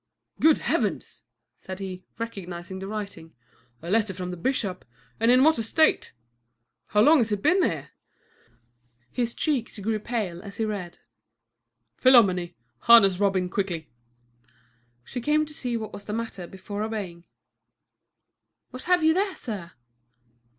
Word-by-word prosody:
"Good 315 0 +5
Heavens!" - - -2 0.4
said 185 0 -8
he, 185 -2 -7
recognizing 190 -5 -6
the 190 - -6
writing. 200 -6 -7 0.5
"A 170 - -6
letter 210 -3 +1
from 180 0 -5
the - - -5
bishop; 190 -2 -2 0.4
and 230 +1 +3
in 255 +2 +6
what 315 -3 +4
a - - -1
state! 315 +8 +2 0.8
How 210 - +3
long 300 +6 +6
has 225 -3 +1
it 205 -1 -2
been 375 +1 +4
here?" - - -1 1.2
His 240 -1 -1
cheek 275 -7 -1
grew 215 +2 -1
pale 210 -7 -3
as 200 +1 -10
he 225 - 0
read. 200 -5 -5 1.0
"Philomène, 185 -9 +5 0.2
harness 200 -6 +6
Robin 195 -3 +2
quickly." 180 -4 -3 1.1
She 245 - -6
came 300 +4 +2
to 300 - -12
see 245 -4 -2
what 220 -2 -6
was 200 - -9
the 210 - -4
matter 225 -6 -4
before 190 +3 -7
obeying. 200 -6 -5 1.5
"What 255 - -8
have 360 -2 +4
you 320 0 +5
there, 385 +2 0
sir?" 195 -7 -7
210 Hz, 145 wpm, -26 LUFS, 185-240 Hz, 1.5 s, in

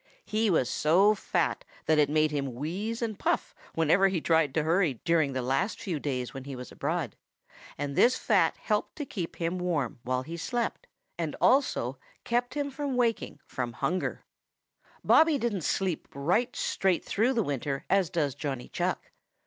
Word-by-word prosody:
He 215 +1 +1
was 155 -9 +3
so 185 +11 +4
fat 175 -5 -1 0.2
that 155 -1 +3
it 145 -2 +4
made 155 0 +2
him 140 -4 -2
wheeze 200 - -3
and 220 -3 -3
puff - - 0 0.2
whenever 165 +5 +4
he 190 -3 0
tried 160 -2 +2
to 160 - +2
hurry 165 -3 +2
during 160 -5 +2
the 130 -1 -2
last 135 - 0
few 175 -7 -3
days 130 -4 -3
he 140 0 -6
was 125 0 -8
abroad, 155 - -2 0.6
and 140 0 -3
this 245 +9 +5
fat 185 -7 +2
helped 210 -1 -1
to 295 - -4
keep 180 -10 -5
him 170 +2 -2
warm 155 -10 -1
while 130 +2 -1
he 165 +5 -6
slept, 240 +7 -2 0.3
and 160 -3 -2
also 270 +1 +2 0.2
kept 245 +2 -1
him 285 -1 -1
from 280 -1 -3
waking 230 -11 0
from 120 -2 -4
hunger. 180 +10 -2 0.6
[Illustration: - - -29
0020] - - -16
Bobby 320 -2 +6
didn't 230 -7 -1
sleep 185 +1 -1
right 185 - +1
straight 190 -3 0
through 230 +6 +1
the 230 -3 +1
winter 140 -2 -3
as 195 -4 +2
does 150 -5 0
Johnny 135 -3 -4
Chuck. - - -2
170 Hz, 175 wpm, -29 LUFS, 145-215 Hz, 0.6 s, Bobby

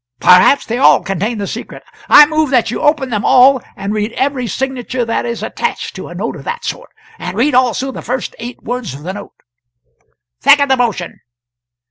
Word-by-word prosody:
"Perhaps 180 +10 +5
they 235 +2 -3
all - - +5
contain 200 +5 -3
the 200 - -3
secret. - - -8 0.3
I 295 - +9
move 310 0 0
that 245 -4 +1
you - - -4
open 295 -4 +1
them 210 -3 -1
all 260 0 +5
and 200 +2 -4
read 215 +1 -2
every 265 -2 -1
signature 255 +1 -3
that 230 +1 -2
is 235 -1 -4
attached 475 - -4
to - - -8
a - - -10
note - - -4
of - - -10
that 475 0 -5
sort - - -5 0.3
and 180 +2 -6
read 285 +6 +2
also 255 +1 +1
the - - -8
first 250 0 -4
eight 240 +1 -8
words 245 - -5
of 145 - -11
the 185 +3 -5
note." 205 0 -10 1.1
"Second 280 0 +4
the 265 - +3
motion!" 225 -8 -2
245 Hz, 195 wpm, -15 LUFS, 210-270 Hz, 1.1 s, I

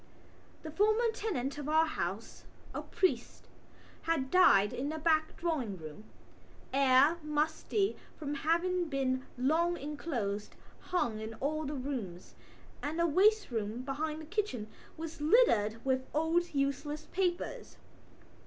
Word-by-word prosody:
The 315 - -6
former 430 +6 +3
tenant 295 - -3
of 295 0 -4
our 315 +1 +5
house, 200 - -4 0.3
a - - -3
priest, 375 - -1 0.5
had 315 -5 -1
died 205 - +6
in 275 +3 -2
the 315 - -3
back 315 0 +1
drawing 280 - -2
room. 155 +5 -10 0.7
Air, 275 +4 +5
musty 310 +7 0 0.2
from 295 -2 -4
having 340 +5 +1
been 260 -2 -1
long 325 +7 +2
enclosed, 250 -9 -4 0.2
hung 240 -12 -1
in 220 +1 -6
all 305 +6 -2
the 290 +1 -3
rooms, 250 -10 -5 0.5
and 300 +3 -3
the 340 - +3
waste 400 +4 +3
room 225 +1 -3
behind 305 +3 -3
the 315 - -8
kitchen 320 - -2 0.3
was 325 -1 -7
littered 265 - +4
with 260 -1 0
old 330 +3 +1
useless 280 +2 -1
papers. 360 -2 -2
300 Hz, 130 wpm, -32 LUFS, 255-335 Hz, 0.7 s, died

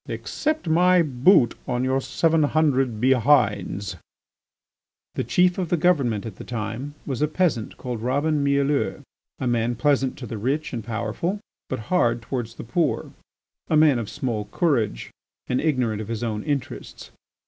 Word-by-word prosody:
Accept 310 - -2
my 180 +2 +4
boot 135 - +4
on 125 0 -1
your 130 +1 +1
seven 165 +3 +1
hundred 135 -6 +2
behinds." 110 -7 +2 1.2
The - - -2
Chief 180 +1 +2
of 180 -3 -2
the 175 - +2
Government 140 - +1
at 110 -5 -7
the - - -8
time 120 +5 -5
was 135 -2 -3
a 150 - +3
peasant 155 -8 -1
called 120 -3 -5
Robin 145 +4 +1
Mielleux, 140 +1 +1 0.3
a 130 - -4
man 120 0 +1
pleasant 135 +1 +1
to 130 - -7
the 115 -2 -6
rich 140 +7 -1
and 115 -3 -4
powerful, 115 - -3 0.3
but 130 - -2 0.2
hard 120 -9 +2
towards 115 -1 -4
the - - -8
poor, 160 +9 -1 0.6
a 155 - +2
man 150 -5 +5
of 110 - -5
small 115 -5 -3
courage 115 - 0 0.3
and 125 - 0
ignorant 125 -9 0
of 105 - -7
his 115 0 -4
own 110 -2 -2
interests. 145 -4 -4
130 Hz, 160 wpm, -24 LUFS, 115-155 Hz, 1.2 s, man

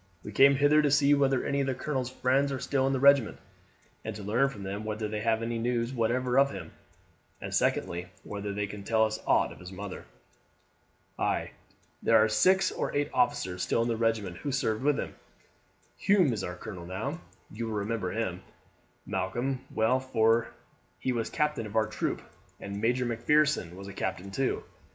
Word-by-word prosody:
We 105 - -7
came 140 +6 +6
hither 145 +2 +5
to 150 - +2
see 145 +1 +4
whether 135 -2 +2
any 140 0 0
of 135 - -1
the 130 - 0
colonel's 130 -2 -2
friends 130 +2 +1
are 135 - -2
still 135 0 0
in 135 - +1
the 135 - 0
regiment, 140 -4 +5 0.7
and 110 -1 -5
to 105 - -7
learn 115 +7 +2
from 105 -7 -9
them 100 +2 -4
whether 110 0 -3
they 105 0 -3
have 115 0 +1
any 115 0 -2
news 120 +1 -1
whatever 125 +2 +1
of 140 0 +5
him; 95 -9 -8 0.7
and - - -6
secondly, 85 +1 0 0.2
whether 100 0 -5
they 100 0 -2
can 100 0 -8
tell 110 +1 +3
us 110 0 -3
aught - - +3
of - - -12
his 90 +1 -10
mother." 95 0 -7 1.1
"Ay, - - 0 0.5
there - - +5
are 110 - +5
six 185 - +3
or - - -2
eight 145 0 0
officers 90 - +1
still 115 - +1
in - - -1
the 115 - +1
regiment 110 -6 0
who 140 - -4
served 110 -5 0
with 145 +1 +2
him. - - -4 0.8
Hume 185 -10 +3
is 105 -4 -3
our 90 - -4
colonel 90 -3 -8
now; 120 - -4 0.3
you 115 +2 -4
will 110 - -3
remember 105 -2 -2
him, 95 -5 -2 0.6
Malcolm, 120 +7 -2
well, 110 +4 +2
for 115 -3 +2 0.5
he 130 - -1
was 115 -2 -1
captain 150 -7 -1
of 105 - -10
our 110 -1 +4
troop; 110 - -3 0.4
and 100 +1 -6
Major 125 +3 +1
Macpherson 120 - +1
was 100 +1 -9
a 100 - -8
captain 95 0 -4
too. 135 +6 -1
115 Hz, 190 wpm, -29 LUFS, 105-135 Hz, 1.1 s, came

